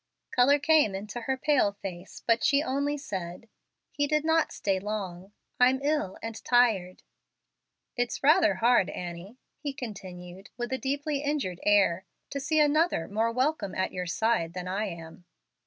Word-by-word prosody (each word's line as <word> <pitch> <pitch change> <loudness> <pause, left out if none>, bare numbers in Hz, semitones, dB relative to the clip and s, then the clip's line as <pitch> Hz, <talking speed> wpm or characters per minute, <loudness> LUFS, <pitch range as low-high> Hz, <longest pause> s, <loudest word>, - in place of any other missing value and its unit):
Color 260 +4 +5
came 290 -8 +3
into 210 +5 -6
her 265 +2 -1
pale 260 -8 +2
face, 190 -2 -9
but 230 -1 +2
she 280 +1 +3
only 285 +1 -1
said, 185 -5 -6 0.4
"He 290 0 0
did 300 +1 +1
not 320 0 +2
stay 195 -2 -1
long. 195 -2 -5 0.3
I'm 255 +1 +5
ill 295 -10 0
and 225 0 -6
tired." 220 -7 +2 0.9
"It's 245 +1 -2
rather 315 +2 +5
hard, 235 -5 +3
Annie," 180 +6 -7 0.2
he 285 -2 -4
continued, 185 -6 -9
with 240 +1 -3
a 260 - -1
deeply 285 +2 -2
injured 285 - -2
air, 195 -3 +3 0.3
"to 280 - -3
see 310 +3 +1
another 300 - +2
more 220 +3 0
welcome 255 -5 -1
at 185 - -1
your 180 0 -4
side 170 -3 0
than 180 0 -5
I 195 +4 -1
am." 170 -1 -9
230 Hz, 155 wpm, -28 LUFS, 185-285 Hz, 0.9 s, Color